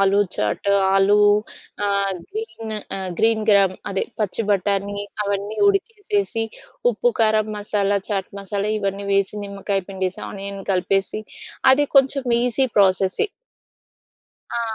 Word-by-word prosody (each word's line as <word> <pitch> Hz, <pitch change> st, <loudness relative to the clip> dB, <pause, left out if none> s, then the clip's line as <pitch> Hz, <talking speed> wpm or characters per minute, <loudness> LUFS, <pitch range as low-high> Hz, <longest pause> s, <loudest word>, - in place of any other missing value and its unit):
ఆలు 195 Hz, +1 st, +4 dB, 0.2 s
చాట్, 105 Hz, -, -1 dB, 0.2 s
ఆలు 195 Hz, +1 st, +4 dB, 0.7 s
ఆహ్, 200 Hz, -1 st, +1 dB, 0.2 s
గ్రీన్ 410 Hz, -, -6 dB, 0.2 s
ఆహ్, 190 Hz, -1 st, -4 dB
గ్రీన్ 225 Hz, -1 st, +3 dB
గ్రామ్, 195 Hz, -2 st, +5 dB, 0.2 s
అదే 195 Hz, -, -1 dB, 0.2 s
పచ్చి 210 Hz, +2 st, 0 dB
బటానీ, 200 Hz, +1 st, 0 dB, 0.3 s
అవన్నీ 200 Hz, +1 st, -3 dB
ఉడికేసేసి 400 Hz, -, -1 dB, 0.5 s
ఉప్పు, -, -, +1 dB
కారం, 215 Hz, -1 st, +3 dB
మసాలా 205 Hz, -1 st, 0 dB
చాట్, 195 Hz, -3 st, -2 dB
మసాలా 200 Hz, +1 st, -2 dB
ఇవన్నీ 200 Hz, 0 st, -3 dB
వేసి, 195 Hz, +1 st, +1 dB
నిమ్మకాయ 200 Hz, 0 st, -2 dB
పిండేసి, 190 Hz, -1 st, -3 dB
ఆనియన్ 195 Hz, 0 st, -6 dB
కలిపేసి, 195 Hz, +3 st, 0 dB, 0.5 s
అది 290 Hz, +2 st, +3 dB
కొంచెం 270 Hz, 0 st, +4 dB, 0.2 s
ఈజీ 250 Hz, +2 st, +1 dB
ప్రాసెసె. 190 Hz, -, +3 dB, 1.3 s
ఆ! -, -, -1 dB
200 Hz, 120 wpm, -22 LUFS, 195-225 Hz, 1.3 s, గ్రామ్